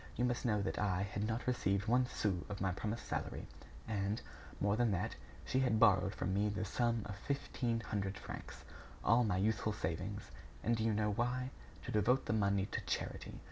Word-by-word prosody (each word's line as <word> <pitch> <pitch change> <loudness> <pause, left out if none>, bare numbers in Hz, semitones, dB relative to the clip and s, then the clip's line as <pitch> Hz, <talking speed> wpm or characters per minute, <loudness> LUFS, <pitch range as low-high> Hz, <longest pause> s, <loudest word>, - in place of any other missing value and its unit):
You 120 - +2
must 120 0 0
know 105 -4 +2
that - - -2
I 100 -2 +1
had 100 +1 -2
not 115 +2 -2
received 100 -6 +1
one 125 +2 +4
sou 95 -7 0
of 100 -1 -4
my 95 -1 +1
promised 105 +5 -3
salary, - - -3 0.4
and, 105 0 0 0.4
more 100 0 +3
than 120 0 +3
that, 90 - -1 0.3
she 130 - +1
had 125 -5 +3
borrowed 100 -3 +5
from 95 0 -1
me 105 +2 +2
the 105 +1 -2
sum 115 +1 +1
of 105 - -5
fifteen 120 -1 -1
hundred 100 -3 -2
francs. - - -8 0.4
All 120 +2 +5
my 100 -5 +1
youthful 110 +2 +1
savings! 95 +2 -3 0.3
And 115 - +3
do 110 - -1
you 110 -1 +3
know 105 0 +2
why? 125 +4 0 0.3
To - - -4
devote 125 +5 +3
the - - 0
money 100 -2 +2
to - - -1
charity! - - -3
105 Hz, 195 wpm, -36 LUFS, 100-115 Hz, 0.4 s, borrowed